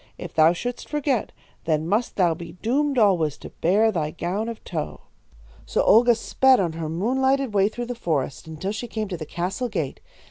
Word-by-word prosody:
If - - -8
thou 160 +1 +6
shouldst 245 +8 -5
forget, 285 -6 0 0.3
then 155 -1 0
must 215 +6 0
thou 175 -4 +3
be 170 +1 -9
doomed 270 +9 0
alway 190 -8 +4
to - - -10
bear 210 +6 +4
thy 160 -6 -1
gown 185 +7 -3
of 230 - -8
tow.' 160 -4 -5 0.7
"So - - +1
Olga 240 +2 +6
sped 260 +3 +3
on 175 -4 0
her 160 -1 -4
moon 220 +11 -1
lighted 265 -3 +2
way 200 0 +3
through 240 +2 -5
the 245 - -4
forest 155 - -2
until 160 +5 -4
she 230 +3 -5
came 215 -2 -4
to 180 - -4
the 155 -2 -7
castle 190 +10 -3
gate. 165 -10 -3
200 Hz, 200 wpm, -24 LUFS, 165-240 Hz, 0.7 s, thou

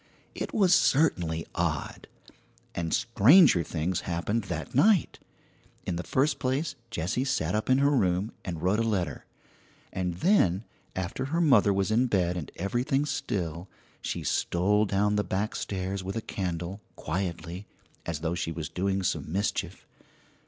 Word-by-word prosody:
It - - -4
was 195 -4 +4
certainly 90 - +2
odd, - - -2 0.7
and 85 -1 -3
stranger 115 - +5
things 85 +3 -2
happened 100 +6 -2
that - - -5
night. 185 - +3 0.7
In 90 - -2
the 85 - -2
first 135 +8 0
place, 135 +4 -1 0.2
Jessie 95 +5 -1
sat 90 - -1
up 110 +3 -1
in 130 - +5
her 140 +1 +3
room 95 -5 +1
and 85 -3 -5
wrote 95 +4 +2
a - - +2
letter; 105 -6 -1 0.7
and 90 -2 -2
then, 95 - +3 0.3
after 95 +8 -3
her 160 +5 -1
mother 125 -11 +5
was 100 +1 0
in 120 +4 +3
bed 90 -6 +1
and 85 -5 -5
everything 125 - 0
still, 85 - -3 0.3
she - - -3
stole 105 +5 +1
down 105 +1 +1
the 105 - +2
back 105 +3 -2
stairs 95 0 -3
with 95 +3 -5
a 115 - -2
candle, 90 0 -4
quietly, 85 +2 -4 0.4
as 80 -3 -4
though 85 0 -1
she 85 -1 -2
was 80 -2 -5
doing 95 +3 -1
some 80 - -2
mischief. 95 -1 -2
95 Hz, 150 wpm, -28 LUFS, 85-115 Hz, 0.7 s, stranger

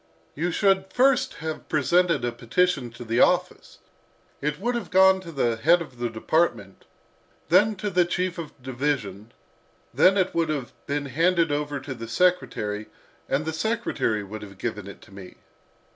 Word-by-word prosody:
You 170 +4 -2
should 190 +1 +1
first 260 +1 +2
have 160 -1 -5
presented 165 -1 +2
a 120 - -1
petition 125 +4 0
to 120 - -9
the 115 +1 -1
office. - - +1 0.6
It 150 +2 -2
would 240 +5 -1
have 235 - -4
gone 190 0 +5
to 170 -3 -9
the 120 -6 0
head 165 +9 +4
of 140 -7 -9
the 120 -1 -1
department, 110 - -1 0.6
then 205 +5 +4
to 205 +1 -4
the 180 -1 +4
chief 180 0 -2
of 160 -3 -6
the 130 - -26
division, 120 -6 -3 0.6
then 190 +2 +5
it 190 -1 +1
would 165 -2 0
have 140 -5 -3
been 145 0 -2
handed 165 +4 +2
over 145 -1 -2
to 140 -1 -6
the 115 -2 -8
secretary, 115 -8 0 0.4
and 140 +3 0
the 160 - -3
secretary 190 - -1
would 105 +2 -8
have 100 -2 -11
given 105 -2 -4
it 100 - -11
to - - -18
me." 95 -2 -11
150 Hz, 175 wpm, -25 LUFS, 120-180 Hz, 0.6 s, gone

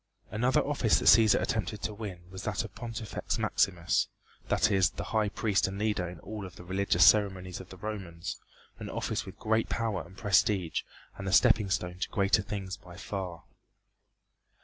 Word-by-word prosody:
Another 125 +4 +2
office 140 -6 +2
that - - -2
Cæsar 110 -1 +7
attempted 105 -1 -2
to 105 - -2
win 100 -5 -7
was 95 0 -7
that 105 +2 -2
of - - -11
Pontifex 115 -3 -4
Maximus 85 -3 +1 0.4
that - - +2
is, 95 -2 +4
the - - -6
High 110 -2 +2
Priest 100 -1 +1
and 95 0 -5
leader 105 -4 0
in 90 -2 -10
all 105 -2 -6
of 90 -3 -9
the - - -11
religious 95 -1 +3
ceremonies 95 -4 +3
of 95 - -13
the 95 - -11
Romans, 95 -5 -5 0.4
an - - -6
office - - -3
with - - -10
great 110 +1 0
power 115 -3 -1
and 95 +3 -15
prestige 95 -4 +2 0.4
and 100 - -5
the - - -1
stepping 110 -2 +5
stone 90 -1 -2
to - - -2
greater 100 +1 +3
things 95 -2 -5
by 90 -1 -13
far. 95 -4 -5
100 Hz, 180 wpm, -30 LUFS, 90-110 Hz, 0.4 s, Cæsar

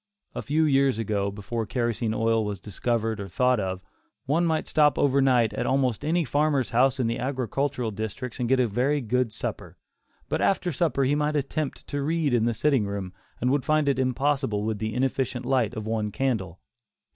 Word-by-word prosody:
A - - -4
few 155 +3 +1
years 135 -4 +3
ago, 100 -3 -1
before 105 +3 -4
kerosene 120 -1 -1
oil 115 0 +2
was 105 -2 -4
discovered 110 +2 -2
or 100 - -5
thought 125 +5 +2
of, 95 -2 -3 0.4
one 165 +6 +2
might 160 -1 0
stop 150 -1 +3
over 140 -1 +3
night 125 -4 +3
at - - -2
almost 130 -3 +1
any 165 +2 +1
farmer's 145 -1 +1
house 130 +2 +3
in 125 - +1
the 115 +1 -1
agricultural 130 -1 -2
districts 110 +5 -5
and 120 -1 -1
get 130 0 +3
a 125 - +4
very 125 +7 +1
good 125 -1 0
supper, - - -6 0.5
but - - -1
after 185 -2 +1
supper 155 -2 +1
he 135 +2 +2
might 150 +1 0
attempt 145 +1 -2
to 145 - -3
read 155 -1 0
in 115 -2 +3
the 120 -1 0
sitting 130 -4 +2
room, 100 -2 -5 0.3
and 125 +2 +1
would 140 -1 +1
find 155 -1 +2
it 135 -2 +2
impossible 130 -4 0
with 110 -1 -2
the 110 0 -3
inefficient 130 -1 -1
light 125 -4 +1
of 110 -1 -5
one 110 -1 -1
candle. 105 -9 -2
125 Hz, 195 wpm, -26 LUFS, 110-140 Hz, 0.5 s, a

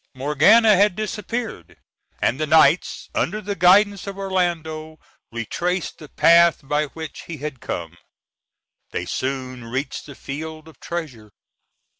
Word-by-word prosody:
Morgana 175 - +5
had 200 0 +3
disappeared, 215 - -5 0.5
and 130 - +1
the 155 - -1
knights, 160 +2 +3
under 210 +5 -1
the 205 -1 -4
guidance 195 +3 +4
of 195 0 -6
Orlando, 165 -5 -2 0.3
retraced 170 - -3
the 150 - -11
path 170 -3 +4
by 150 +2 +1
which 160 +1 -9
he 165 - -6
had 145 -4 -6
come. 85 0 -5 0.9
They - - -4
soon 130 -2 -4
reached 130 +6 -4
the 140 - -10
field 155 +4 -7
of 160 - -16
treasure. 140 -11 -6
160 Hz, 130 wpm, -22 LUFS, 140-190 Hz, 0.9 s, Morgana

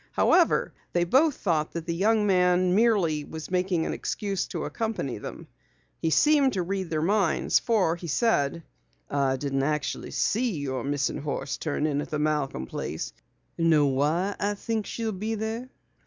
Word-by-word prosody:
However, - - +3 0.2
they 175 - +3
both 270 - +3
thought 160 -5 -1
that 170 -1 -4
the 170 - -2
young 210 +4 +2
man 180 -1 +3
merely 195 -9 +3
was 160 +3 -8
making 180 -2 +1
an - - -2
excuse 200 -3 -2
to - - -4
accompany 220 - -3
them. - - -8 0.6
He 165 - +1
seemed 280 - +4
to 185 - 0
read 190 0 -3
their 155 -1 -1
minds 195 -2 +2
for 200 -8 +2
he 170 0 -8
said: 165 - +1 0.5
"I 135 -2 +1
didn't 135 0 -1
actually 150 +1 -2
see 235 +1 0
your 130 -4 -3
missing 140 0 -1
horse 140 -2 -3
turn 155 -1 -2
in 145 -2 0
at - - -7
the 150 - -2
Malcom 150 - -1
place. - - -5 0.5
Know 160 -3 +4
why 150 +9 +1
I 205 +1 0
think 220 0 -3
she'll 225 -1 -3
be 215 +3 -3
there?" 220 +4 -4
175 Hz, 170 wpm, -26 LUFS, 150-210 Hz, 0.6 s, seemed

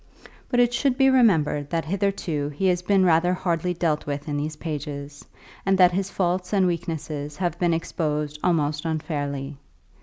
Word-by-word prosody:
But 245 - +1
it 245 0 +4
should 255 +1 +1
be 270 -1 +5
remembered 160 - +3
that 165 -1 -1
hitherto 175 -5 -1
he 150 +6 -3
has 180 -1 +1
been 190 0 +3
rather 175 +1 +3
hardly 175 0 -1
dealt 160 -4 -1
with 145 +1 -4
in 145 - -2
these 150 +2 -3
pages, 145 -2 -6 0.4
and 195 0 +2
that 180 -1 +6
his 190 +2 -1
faults 180 0 -1
and 195 -2 +4
weaknesses 155 -4 -3
have 175 -2 -2
been 175 -1 +2
exposed 150 -2 -2
almost 150 -4 +1
unfairly. 145 -3 -3
165 Hz, 170 wpm, -24 LUFS, 150-185 Hz, 0.4 s, that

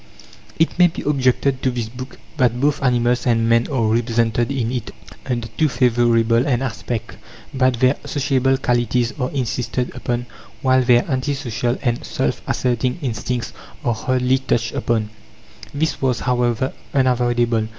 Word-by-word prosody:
It 165 +2 +1
may 180 - +8
be 165 - -6
objected 135 -1 +1
to 130 - +1
this 120 -3 -3
book 125 +3 -9 0.2
that 125 -4 +2
both 145 +2 +1
animals 125 -1 +1
and 115 -1 +2
men 115 0 +3
are 130 -4 +1
represented 115 +1 +1
in 125 -4 -1
it 125 -3 -3 0.4
under 120 -3 -2
too 135 +8 0
favourable 120 -1 +2
an 130 -2 +1
aspect; 115 -2 -4 0.4
that 130 -2 +2
their 130 +3 +3
sociable 135 -2 +1
qualities 120 -2 0
are 125 - 0
insisted 125 -2 -2
upon, 120 0 -2 0.4
while 130 0 +4
their 120 -1 +4
anti 140 0 -1
social 120 -2 -2
and 120 -2 0
self - - -2
asserting 125 0 0
instincts 125 -1 -3 0.3
are 120 - +2
hardly 130 +3 +1
touched 120 -3 -1
upon. 110 -2 -1 0.6
This 160 +3 -1
was, 130 -3 +1
however, 125 0 0 0.2
unavoidable. 120 -3 +2
125 Hz, 150 wpm, -20 LUFS, 120-130 Hz, 0.6 s, may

